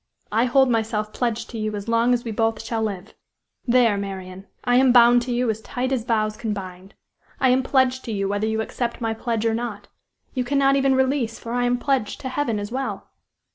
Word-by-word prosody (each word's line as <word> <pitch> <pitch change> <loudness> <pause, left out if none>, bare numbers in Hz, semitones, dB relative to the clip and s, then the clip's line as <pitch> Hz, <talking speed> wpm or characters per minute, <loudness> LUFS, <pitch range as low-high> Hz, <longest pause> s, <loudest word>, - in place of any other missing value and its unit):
I 225 +3 +3
hold 265 +2 +4
myself 220 -2 -1
pledged 235 -2 -2
to 230 - -5
you 215 0 -2
as 205 +1 -6
long 230 +1 +2
as 245 -1 +1
we 230 - -4
both 225 0 0
shall 225 -2 -2
live! 200 -2 -4 0.5
There, 235 -4 +4
Marian! 190 -1 -6 0.2
I 245 0 +3
am 260 0 +5
bound 240 0 +6
to 245 +1 -4
you 240 -1 +1
as 220 0 -6
tight 255 +3 -3
as 245 -4 -1
vows 215 -3 0
can 215 -1 -3
bind! 185 0 -9 0.4
I 260 - +3
am 255 +1 +4
pledged 260 -1 +1
to 230 - -4
you 195 -2 -1
whether 205 +2 -1
you 220 0 0
accept 235 +1 -3
my 225 -2 -1
pledge 225 0 -2
or 225 - +2
not. 230 -3 -5 0.4
You 255 - -1
cannot 275 +1 +2
even 270 -1 +3
release, 260 -3 0
for 230 - -8
I 245 0 +1
am 245 0 +2
pledged 255 -5 -1
to 260 - -4
Heaven 255 -5 -1
as 205 +1 -5
well. 265 +2 -4
230 Hz, 220 wpm, -23 LUFS, 215-250 Hz, 0.5 s, bound